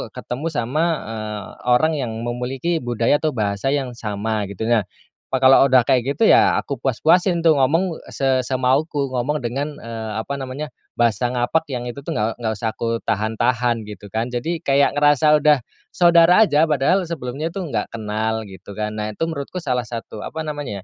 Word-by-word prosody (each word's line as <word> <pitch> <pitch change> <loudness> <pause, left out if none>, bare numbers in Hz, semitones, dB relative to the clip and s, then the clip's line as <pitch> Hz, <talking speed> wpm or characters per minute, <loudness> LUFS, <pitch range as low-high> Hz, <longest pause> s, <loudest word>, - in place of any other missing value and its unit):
ketemu 135 +7 -4
sama, 145 +4 0 0.2
eee, 110 -2 -5 0.2
orang 140 +6 +4
yang 120 -4 -3
memiliki 130 +7 -2
budaya 120 +3 +1
atau 155 -4 -1
bahasa 100 +2 -1
yang 135 -3 -2
sama 105 -2 -3
gitu 100 +2 -6
nah, 110 -4 +2 0.5
wah 130 - +2
kalau 130 +1 +7
udah 130 -1 +5
kayak 130 +2 +2
gitu 225 - +3
ya - - +6
aku 140 - -5
puas-puasin 170 - +2
tuh 160 -3 +5
ngomong 165 +6 +1 0.2
se 130 -1 +1
semauku 135 +2 0
ngomong 130 +4 -1
dengan, 140 +5 -3
eee, 110 -1 -6
apa 140 +5 -5
namanya 135 +3 -5 0.3
bahasa 120 +1 +1
ngapak 125 +7 0
yang 120 - -3
itu 120 - -7
tuh - - -3
nggak 110 +2 -1
nggak 110 -2 -1
usah 110 +1 -2
aku 115 0 -2
tahan-tahan 115 +2 0
gitu 105 -1 -9
kan 115 +2 -1
jadi 160 +8 -3
kayak 140 -2 +3
ngerasa 145 +1 +4
udah 150 -1 +5 0.3
saudara 175 +4 +5
aja 150 -3 +3
padahal 150 +6 +2
sebelumnya 145 +1 -4
tuh 185 +1 -4
nggak - - -2
kenal 110 0 -2
gitu 95 +1 -12
kan 105 0 -2
nah 105 0 -3
itu 105 - -4
menurutku 160 +1 -5
salah 125 -4 0
satu 115 -2 -7
apa 160 - -5
namanya 145 -11 -5
125 Hz, 180 wpm, -21 LUFS, 115-150 Hz, 0.5 s, kalau